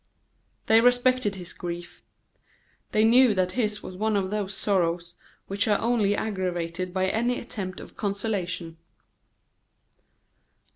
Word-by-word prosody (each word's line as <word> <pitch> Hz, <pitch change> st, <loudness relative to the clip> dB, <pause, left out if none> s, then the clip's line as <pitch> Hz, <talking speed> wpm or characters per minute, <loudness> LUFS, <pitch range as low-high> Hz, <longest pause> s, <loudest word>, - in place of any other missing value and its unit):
They 225 Hz, +1 st, +6 dB
respected 245 Hz, -3 st, +3 dB
his 180 Hz, -2 st, -8 dB
grief. 175 Hz, 0 st, -7 dB, 0.9 s
They 215 Hz, -, +3 dB
knew 235 Hz, 0 st, +6 dB
that 185 Hz, -1 st, +1 dB
his 210 Hz, -3 st, -1 dB
was 185 Hz, -, -8 dB
one 215 Hz, +2 st, 0 dB
of 190 Hz, -1 st, -1 dB
those 205 Hz, -2 st, -2 dB
sorrows 175 Hz, -3 st, 0 dB, 0.3 s
which 200 Hz, +2 st, -1 dB
are 210 Hz, -1 st, +4 dB
only 220 Hz, -3 st, +2 dB
aggravated 185 Hz, -4 st, -2 dB
by 190 Hz, 0 st, 0 dB
any 240 Hz, +5 st, 0 dB
attempt 195 Hz, -6 st, -6 dB
at -, -, -12 dB
consolation. 190 Hz, -5 st, -3 dB
200 Hz, 125 wpm, -26 LUFS, 180-220 Hz, 0.9 s, They